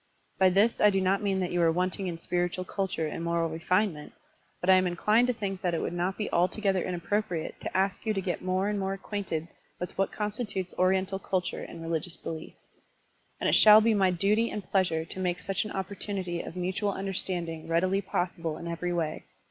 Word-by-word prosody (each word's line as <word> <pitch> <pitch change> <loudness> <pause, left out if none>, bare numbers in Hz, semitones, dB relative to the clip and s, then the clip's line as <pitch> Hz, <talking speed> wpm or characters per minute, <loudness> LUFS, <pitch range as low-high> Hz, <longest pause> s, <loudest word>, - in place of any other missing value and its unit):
By 190 -1 +6
this 200 +5 +3
I 210 - +7
do 195 -1 +1
not 190 +2 +2
mean 195 -2 0
that 180 - -1
you 175 - +1
are 165 -1 +5
wanting 185 +3 -1
in 170 -2 -3
spir 175 +1 0
itual 185 +1 -5
culture 190 -5 -2
and 160 +2 -4
moral 170 -1 0
refinement, 165 -1 0 0.5
but 180 - -4
I 190 - +8
am 185 0 +4
inclined 210 +7 +3
to 250 - +2
think 195 -4 -4
that 175 -2 0
it - - 0
would - - -2
not 180 +2 -1
be 210 - -2
altogether 190 +2 +2
inappropriate 175 -1 -2
to - - -3
ask 190 0 +1
you 220 - 0
to 205 - 0
get 185 -2 -2
more 185 +1 0
and 210 -1 -1
more 195 0 -1
acquainted 195 -5 -4 0.3
with 180 - -5
what 195 - +2
constitutes 210 -3 -3
Oriental 190 +1 +2
cul 185 -1 0
ture 180 - -5
and 165 -1 -8
religious 165 +1 -2
belief. 160 -1 -6 0.9
And - - 0
it - - +3
shall 215 0 +9
be 225 +1 +3
my 195 -3 +4
duty 205 +6 +2
and 210 - -4
pleasure 175 -5 +2
to 190 - -8
make 180 -1 0
such 195 +2 -1
an 210 - -6
opportunity 190 -2 -3
of - - -8
mutual 185 +3 -1
imderstanding 175 -4 -3
readily 185 +4 +2
possible 175 -4 -2
in 170 - -7
every 170 +1 -2
way. 160 -3 -2
185 Hz, 210 wpm, -29 LUFS, 175-195 Hz, 0.9 s, shall